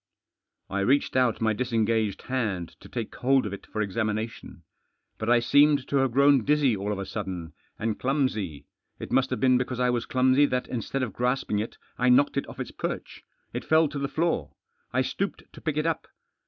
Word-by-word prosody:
I 100 - -2
reached 130 +9 +2
out 125 -4 +2
my 110 -1 +2
disengaged 110 -3 0
hand 105 -10 -2
to 100 - -14
take 115 -3 -4
hold 135 0 +2
of 100 - -4
it 100 - -9
for 110 - -2
examination. 110 -2 -3 0.6
But 110 - -2
I 120 0 +6
seemed 145 +3 +4
to 140 - +2
have 135 -2 +2
grown 140 0 +5
dizzy 145 -4 +3
all 100 +1 -3
of 105 - -2
a 100 - -4
sudden* 90 -7 -5 0.2
and 110 -1 -2
clutnsy. 110 - -1 0.3
It - - -8
must 135 0 +3
have - - -2
been 130 -1 +4
because 125 -1 -3
I 125 0 +3
was 120 -1 -2
clumsy 130 +2 +4
that, 125 -1 -1
instead 130 +2 -2
of 110 -6 -3
grasping 125 -3 0
it, 110 - -4 0.2
I 125 0 +3
knocked 135 +3 +4
it 140 - -1
off - - -11
its - - -4
peith. - - -5 0.3
It - - -3
fell 160 0 +4
to 145 -1 -5
the 140 - -1
floor. 165 +4 -1 0.4
I 130 +1 +2
stooped 195 +9 -3
to - - -12
pick 155 -2 -2
it 155 - +1
up. 165 -2 -1
125 Hz, 205 wpm, -27 LUFS, 110-135 Hz, 0.6 s, I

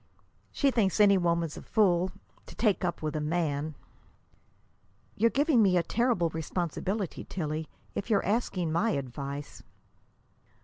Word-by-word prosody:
"She 280 -2 +2
thinks 215 -5 +1
any 205 -1 +7
woman's 170 -3 0
a - - -7
fool 185 -4 +2 0.4
to - - -11
take 210 -5 +1
up 175 -3 -2
with 155 0 -2
a 155 - -1
man." 155 -2 -1 1.4
"You're 230 +3 +3
giving 280 -1 +3
me 190 -3 +4
a 170 - +2
terrible 230 -8 +1
responsibility, 175 +4 -3
Tillie, 155 -3 -4 0.2
if 200 - -4
you're 205 -3 +2
asking 195 -6 0
my 210 +7 +1
advice." 140 +2 -6
175 Hz, 135 wpm, -29 LUFS, 155-210 Hz, 1.4 s, any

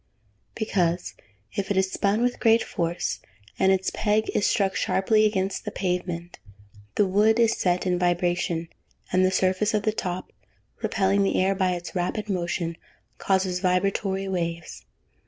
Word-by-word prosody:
_ - - -40
Because, 180 -5 0 0.4
if 200 - -2
it 200 - 0
is 190 0 +2
spun 205 +4 +1
with 245 0 0
great 225 -1 +4
force, 170 0 -2 0.4
and 190 - +4
its 190 0 +1
peg 215 0 +1
is 205 - +2
struck 195 -4 +1
sharply 215 +3 +3
against 195 -2 -2
the - - -3
pavement, 180 -3 -3 0.6
the 205 - +4
wood 210 +4 +3
is 230 -1 +4
set 180 0 0
in 180 -1 +1
vibration, 175 -1 0 0.5
and 185 0 +4
the 185 - +4
surface 190 +3 +1
of 210 - 0
the 215 - +2
top, 180 -3 -4 0.5
repelling 200 -1 +1
the 195 - +1
air 190 +1 +3
by 185 -2 +1
its 175 -1 -6
rapid 195 +4 -2
motion, 170 -2 -2 0.4
causes 190 -2 +1
vibratory 190 +1 0
waves. 170 -3 -4
190 Hz, 155 wpm, -25 LUFS, 180-205 Hz, 0.6 s, great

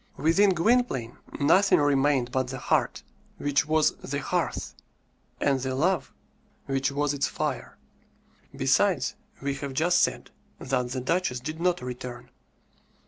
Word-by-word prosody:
Within 170 +8 +4
Gwynplaine 170 - +1 0.2
nothing 185 +8 +4
remained 140 -3 +2
but 130 0 0
the 130 +1 -5
heart, - - 0 0.3
which 145 0 +1
was 155 0 +3
the - - -4
hearth, - - -2 0.7
and 140 -2 +2
the 130 0 -3
love, 175 +6 0 0.5
which 135 0 0
was 145 +1 0
its 140 0 0
fire. - - -4 0.8
Besides, - - +2 0.3
we 140 0 0
have 140 0 -6
just 175 +6 +3
said - - -1 0.3
that 125 -1 -2
"the 130 0 -3
duchess" 130 -2 0
did 155 +5 -6
not 180 -6 +1
return. 125 -1 -7
140 Hz, 135 wpm, -26 LUFS, 130-160 Hz, 0.8 s, Within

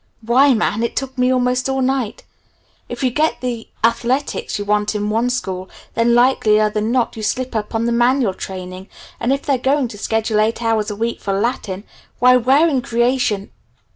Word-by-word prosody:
Why, 255 +4 +4
man, 220 0 0
it 235 - -2
took 265 0 -3
me 250 0 +2
almost 250 0 +1
all 265 0 0
night! 255 -4 -1 0.7
If - - -5
you 255 - +2
get 310 +5 0
the 240 -3 -4 0.2
athletics 245 +4 0
you 205 - -4
want 210 +1 0
in 210 0 -1
one 230 +3 +1
school, 190 -7 -3 0.2
then 235 +1 +2
likelier 220 -4 +3
than 215 +2 -1
not 245 -2 0
you 220 - -6
slip 255 +3 -2
up 215 +1 -3
on 225 +1 0
the 235 - 0
manual 240 -2 +2
training, 185 0 -8 0.3
and 245 - 0
if 275 +1 0
they're 275 -3 0
going 270 +1 +1
to 205 - -10
schedule 220 0 0
eight 225 +2 0
hours 225 -2 +1
a 210 - -4
week 230 +3 -3
for 195 0 -1
Latin, 205 -4 -2 0.3
why 250 +1 +5
where 265 +6 +4
in 275 -6 +1
Creation 235 -4 0
235 Hz, 195 wpm, -19 LUFS, 215-255 Hz, 0.7 s, why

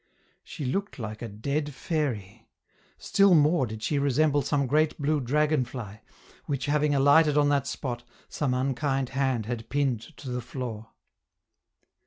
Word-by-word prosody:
She 145 - -7
looked 195 +11 -2
like 110 -3 -6
a 120 - -4
dead 140 +7 -3
fairy; 125 - -3 0.5
still 195 -2 +4
more 150 -3 +4
did 110 0 -7
she 145 - 0
resemble 145 +1 +2
some 140 +1 0
great 150 +4 +2
blue 150 0 +1
dragon 150 +2 +2
fly, 115 -4 -8 0.5
which, 135 -2 -2
having 145 0 +2
alighted 145 +2 +5
on 145 -1 +4
that 140 -1 +1
spot, 120 -3 -4 0.2
some 135 -4 -1
unkind 135 0 0
hand 130 -4 0
had 115 -1 -5
pinned 135 -5 0 0.2
to 130 - -7
the 125 0 -2
floor. 115 -3 -6
140 Hz, 150 wpm, -27 LUFS, 120-150 Hz, 0.5 s, alighted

